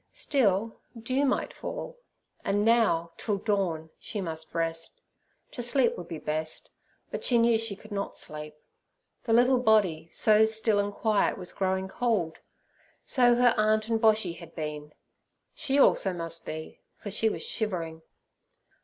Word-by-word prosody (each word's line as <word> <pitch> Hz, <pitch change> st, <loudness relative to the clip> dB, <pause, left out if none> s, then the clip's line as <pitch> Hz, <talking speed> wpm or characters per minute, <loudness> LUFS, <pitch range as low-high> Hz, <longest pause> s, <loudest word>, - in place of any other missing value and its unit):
Still, 220 Hz, -5 st, 0 dB, 0.2 s
dew 255 Hz, +5 st, 0 dB
might 270 Hz, -, 0 dB
fall. -, -, -7 dB, 0.4 s
And 205 Hz, +1 st, +1 dB
now, 220 Hz, -8 st, +3 dB
till 210 Hz, -3 st, -1 dB
dawn, 185 Hz, -6 st, -1 dB
she 215 Hz, -, -5 dB
must 160 Hz, -4 st, -5 dB
rest—to 165 Hz, -, -6 dB
sleep 240 Hz, +1 st, +2 dB
would 175 Hz, -, -8 dB
be 165 Hz, -, -5 dB
best, 155 Hz, +1 st, -4 dB, 0.4 s
but -, -, -4 dB
she 245 Hz, -, +3 dB
knew 230 Hz, -1 st, +4 dB
she 225 Hz, -3 st, -2 dB
could 215 Hz, +2 st, -16 dB
not 200 Hz, -1 st, -4 dB
sleep. 150 Hz, 0 st, -6 dB, 0.7 s
The 225 Hz, -, +1 dB
little 250 Hz, +2 st, +5 dB
body, 205 Hz, -9 st, +2 dB
so 215 Hz, 0 st, +5 dB
still 220 Hz, -1 st, +2 dB
and 205 Hz, 0 st, 0 dB
quiet, 215 Hz, 0 st, +1 dB
was 180 Hz, -1 st, -5 dB
growing 190 Hz, 0 st, -1 dB
cold. 195 Hz, -7 st, -1 dB, 0.7 s
So 245 Hz, -2 st, +4 dB
her 245 Hz, 0 st, +5 dB
aunt 215 Hz, +1 st, +2 dB
and 225 Hz, -1 st, +1 dB
Boshy 215 Hz, -5 st, +3 dB
had 170 Hz, -2 st, -12 dB
been; 150 Hz, -1 st, -5 dB, 0.6 s
she 275 Hz, 0 st, 0 dB
also 195 Hz, -8 st, +4 dB
must 165 Hz, -1 st, -5 dB
be, 155 Hz, 0 st, -7 dB, 0.2 s
for 205 Hz, -, -7 dB
she 220 Hz, +2 st, +2 dB
was -, -, -5 dB
shivering. 170 Hz, -7 st, -3 dB
205 Hz, 150 wpm, -28 LUFS, 165-230 Hz, 0.7 s, little